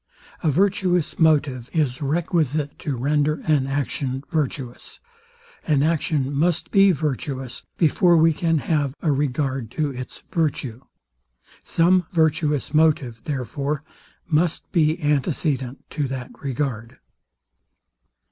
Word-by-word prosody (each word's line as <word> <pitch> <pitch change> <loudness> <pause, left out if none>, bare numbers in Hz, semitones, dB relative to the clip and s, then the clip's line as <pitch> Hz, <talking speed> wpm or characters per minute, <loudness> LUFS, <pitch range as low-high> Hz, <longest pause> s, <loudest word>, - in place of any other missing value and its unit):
A 160 - +2
virtuous 180 -1 +1
motive 145 -6 +2
is 145 -5 0
requisite 150 -1 0
to 145 -5 -3
render 145 +4 +1
an 145 -4 +1
action 135 -1 -2
virtuous. 135 -6 -3 0.7
An 145 -3 +3
action 150 -3 0
must 165 +4 0
be 195 -1 +6
virtuous, 135 -4 -3 0.2
before 170 +2 +4
we 165 0 +5
can 165 +1 +1
have 145 -4 0
a 160 - +3
regard 135 -3 -1
to 150 -2 +1
its 125 -1 -8
virtue. 140 -8 -1 0.8
Some 180 +1 +3
virtuous 155 -4 +1
motive, 150 -7 +2
therefore, 140 +2 -3 0.4
must 165 0 0
be 160 -1 +2
antecedent 140 -3 -1
to 145 -3 -1
that 130 -1 -6
regard. 130 -3 -3
150 Hz, 110 wpm, -23 LUFS, 135-160 Hz, 0.8 s, be